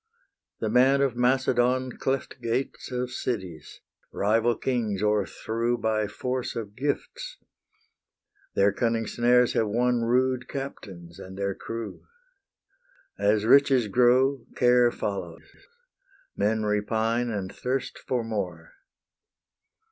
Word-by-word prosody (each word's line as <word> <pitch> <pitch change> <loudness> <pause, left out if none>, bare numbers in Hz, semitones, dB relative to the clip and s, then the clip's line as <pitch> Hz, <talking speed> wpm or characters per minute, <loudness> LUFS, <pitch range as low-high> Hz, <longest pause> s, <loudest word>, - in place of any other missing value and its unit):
The - - -1
man 135 +3 +4
of 135 -3 +1
Macedon 125 0 +2
Cleft 135 -1 -2
gates 120 +3 -2
of 125 0 -2
cities, 95 - -5 0.3
rival 115 +3 +2
kings 110 -6 -1
o'erthrew 110 +3 0
By 110 -2 0
force 125 +4 -3
of 105 -3 -6
gifts: - - -3 1.2
their 100 +1 +4
cunning 115 0 0
snares 120 +2 +3
have 110 - +1
won 120 +3 +1
Rude 125 +1 +1
captains 95 -10 -8
and 95 0 -10
their 100 0 -1
crew. 115 +1 -7 1.2
As 105 +1 +2
riches 135 -2 +5
grow, 125 +3 +3
care 125 -1 +5
follows: 95 -7 -5 0.9
men 110 +1 +1
repine 110 +3 0
And 100 -4 -4
thirst 130 +1 -3
for 125 -2 -2
more. 100 -7 -4
120 Hz, 110 wpm, -26 LUFS, 105-125 Hz, 1.2 s, riches